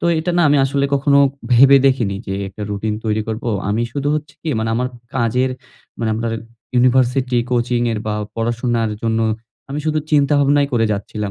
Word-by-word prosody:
তো - - -4
এটা 160 +3 -1
না 175 - +4
আমি 145 - +4
আসলে 140 +1 0
কখনো 140 0 +3 0.3
ভেবে 135 +3 +7
দেখিনি 120 -7 +1
যে 95 - -3
একটা 105 +2 -9
রুটিন 105 +1 -2
তৈরি 110 0 0
করব। 110 +1 -4 0.2
আমি 110 +3 0
শুধু 145 0 -2
হচ্ছে 150 -1 -5
কী 160 - -4
মানে 110 - -1
আমার 125 +2 0 0.3
কাজের 125 +1 +1 0.5
মানে 115 - -1
আপনার 115 +1 -2 0.4
ইউনিভার্সিটি, 125 0 +2
কোচিং 120 0 +1
এর 105 - -2
বা 105 - -1 0.2
পড়াশোনার 115 -1 -1
জন্য 115 0 +1 0.5
আমি 150 - -2
শুধু 155 0 +1
চিন্তা 145 0 +4
ভাবনাই 140 0 +3
করে 115 -2 +2
যাচ্ছিলাম। 105 0 -4
120 Hz, 180 wpm, -19 LUFS, 110-140 Hz, 0.5 s, ভেবে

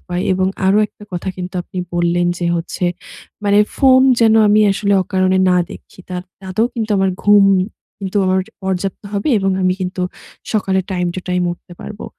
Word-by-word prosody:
উপায় 180 0 -4
এবং 185 0 +1 0.2
আরো 195 +2 +4
একটা 210 - -16
কথা 175 +2 -4
কিন্তু 180 +1 -6
আপনি 185 - -8 0.2
বললেন 175 0 +1
যে 175 - -1
হচ্ছে, 170 +2 -4 0.6
মানে 205 0 +4 0.2
ফোন 260 -2 +5 0.2
যেন 225 -1 +5
আমি 210 +1 +4
আসলে 200 +1 0
অকারণে 185 0 +1
না 180 - +4
দেখি। - - -13
তা 180 - -3 0.3
তাতেও 190 +4 0
কিন্তু 225 -2 -3
আমার 190 0 +2
ঘুম 205 -1 +6 0.6
কিন্তু 195 +1 -2
আমার 185 0 +2 0.2
পর্যাপ্ত 190 0 -3
হবে 200 +7 -1
এবং 195 -1 0
আমি 185 - +3
কিন্তু 185 0 -3 0.5
সকালে 195 -3 +1
টাইম 180 -2 -1
টু 185 - -4
টাইম 180 0 0
উঠতে 175 +1 -14
পারবো। 210 - -8
190 Hz, 175 wpm, -17 LUFS, 180-205 Hz, 0.6 s, ঘুম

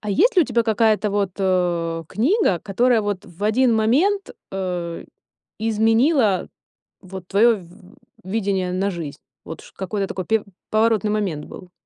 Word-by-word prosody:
А 210 - -4
есть 430 - +3
ли 355 - +7
у - - -1
тебя 240 -2 +1
какая-то 220 -1 +2
вот, 200 -2 -1
э, 175 -3 0
книга, 235 - +1
которая 235 +4 +2
вот 205 -1 -3
в 175 +2 -13
1 235 +2 +3
момент, 320 - +2 0.2
э, 180 -3 -4 0.6
изменила 225 - +2 0.5
вот 185 -1 -9
твоё 225 +3 +4
в 170 -2 -15 0.5
видение 190 -2 -1
на 195 +2 0
жизнь? 165 -5 -6 0.3
Вот 160 - -8
чт - - -16
какой-то 195 +1 -2
такой 185 -1 -5
пе 220 -1 +1 0.3
поворотный 215 -1 +2
момент 190 -8 -2
был. 180 -1 -11
205 Hz, 150 wpm, -21 LUFS, 185-225 Hz, 0.6 s, ли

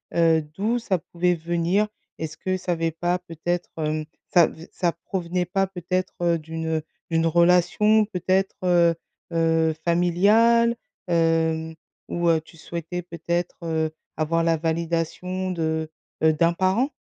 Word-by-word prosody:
heu, 165 -1 +4
d'où 195 +11 -2
ça 205 -5 0
pouvait 175 +1 0
venir? 170 +5 0 0.3
Est-ce 155 -1 -5
que 185 0 -1
ça 180 -1 -2
avais 165 -1 -1
pas 175 +3 0
peut-être, 175 0 -3
hem, 155 -1 -1 0.2
ça 175 -2 +6
v 165 +2 -11
ça 175 -2 0
provenait 175 +1 -3
pas 195 +2 +1
peut-être, 185 0 -3
heu, 170 -1 +3
d'une, 160 +1 -5
heu, 160 -1 -1 0.3
d'une 165 0 +2
relation 180 +6 +4
peut-être, 190 0 0
heu 175 -2 +4 0.4
heu, 165 -1 +2
familiale? 210 +8 +4 0.3
Hem, 165 -1 +1 0.4
où, 175 0 -1
heu, 165 -1 +4
tu 165 +1 -18
souhaitais 170 +2 -5
peut-être, 170 0 -3
heu, 160 -1 -1 0.3
avoir 165 +1 +1
la 165 0 +3
validation 170 +3 -2
de, 160 -2 -1 0.3
heu, 160 0 +5
d'un 170 +2 +3
parent? 190 - +1
170 Hz, 145 wpm, -24 LUFS, 160-180 Hz, 0.4 s, ça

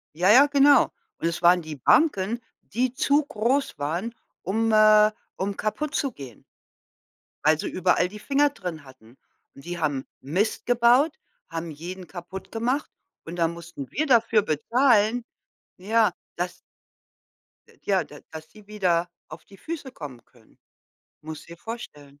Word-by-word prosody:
Ja, 180 +4 +2
ja, 260 +6 +8
genau. 285 0 +6 0.4
Und - - 0
es 170 0 -3
waren 175 +1 +5
die 155 -2 -7
Banken, 225 - +2 0.3
die 250 +2 0
zu 285 +3 +2
groß 265 - 0
waren, 170 +11 -2 0.3
um 225 +4 0
äh, 215 0 +6 0.3
um 200 +1 -2
kaputtzugehen 215 - -3 1.0
weil 155 0 +4
sie - - -3
überall 180 0 +2
die 210 +1 -10
Finger 285 +4 +2
drin 180 - -7
hatten. 130 -2 -18 0.4
Und 140 - -14
die 175 0 -5
haben 145 -4 -1 0.2
Mist 185 +11 -1
gebaut, 245 +6 +4 0.3
haben 165 0 -5
jeden 175 +4 -8
kaputtgemacht. 225 - -4 0.4
Und 165 +2 -7
dann 165 -1 +1
mussten 170 -5 -9
wir 310 - 0
dafür 230 -5 +4
bezahlen 225 - +2 0.6
ja, 220 +3 +2 0.2
dass 175 +1 -4 1.1
äh, - - -22
ja, 195 -2 +1
da 145 - -13
dass 160 0 -9
sie 210 -2 -17
wieder 180 -5 0 0.2
auf 155 +1 -11
die 195 - -17
Füße 305 -2 -6
kommen 140 - -9
können. 115 -3 -25 0.7
Musste 160 +1 -9
dir 170 - -10
vorstellen. 145 -11 -9
190 Hz, 145 wpm, -25 LUFS, 160-235 Hz, 1.1 s, ja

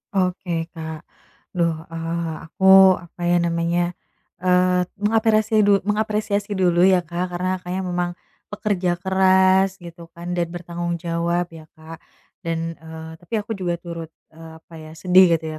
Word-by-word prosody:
Oke, 175 -3 -1
Kak. 160 -2 -7 0.5
Aduh, 170 -3 0 0.2
e 165 - -7 0.5
aku 180 - -9 0.4
apa 175 +1 -15
ya 175 - +3
namanya, 170 +1 0 0.5
e 185 - -5 0.6
mengapresi 220 0 +2
du 200 -1 +4
mengapresiasi 210 0 -1
dulu 180 -2 +2
ya 185 -2 +4
Kak, 175 +2 -3
karena 185 +1 -1
Kakaknya 180 +1 -4
memang 175 -1 -1 0.4
pekerja 195 -4 -1
keras 190 +1 +3
gitu 170 0 -11
kan, 175 +1 -6
dan 175 -1 0
bertanggung 175 0 -4
jawab 170 +1 -2
ya 160 -1 -12
Kak. 160 +1 -11 0.4
Dan, 165 -1 -3
e 160 - -15 0.3
tapi 175 +6 -15
aku 210 +2 -9
juga 175 -2 -1
turut, 170 -1 -7 0.2
e 160 - -18 0.2
apa 170 - -20
ya, 155 0 -11
sedih 180 +1 +5
gitu 160 0 -6
175 Hz, 145 wpm, -22 LUFS, 170-190 Hz, 0.6 s, sedih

